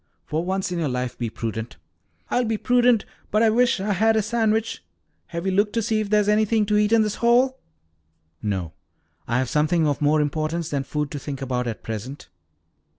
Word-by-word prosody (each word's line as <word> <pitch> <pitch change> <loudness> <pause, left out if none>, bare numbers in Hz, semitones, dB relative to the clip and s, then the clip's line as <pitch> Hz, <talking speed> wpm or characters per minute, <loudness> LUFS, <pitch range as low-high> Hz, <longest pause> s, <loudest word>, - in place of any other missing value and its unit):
For 155 +2 -2
once 190 0 -2
in 175 - -2
your 155 -4 0
life 125 -1 -3
be 120 -2 -3
prudent." 110 +1 -5 0.5
"I'll 250 - +2
be 225 -2 -1
prudent, 245 -1 +3 0.2
but 215 +2 +2
I 225 - +5
wish 245 0 +3
I 205 +2 0
had 220 +4 +3
a 220 - +2
sandwich. 220 - 0 0.4
Have 170 +2 -5
you 190 - +1
looked 205 +2 +1
to 230 - +1
see 220 0 +1
if 215 -2 -2
there's 210 -1 +3
anything 215 +1 +3
to 210 0 +1
eat 210 0 +2
in 230 -1 +5
this 210 -1 -2
hole?" 250 +3 +3 0.8
"No, 95 -6 -3 0.5
I 120 - +1
have 130 0 0
something 155 +4 +2
of 145 -1 -1
more 150 +1 +3
importance 155 +2 -1
than 140 -3 -2
food 150 0 -3
to 145 - -4
think 140 -1 -6
about 125 -2 -2
at 115 - -5
present." 115 +6 -6
185 Hz, 205 wpm, -23 LUFS, 140-220 Hz, 0.8 s, I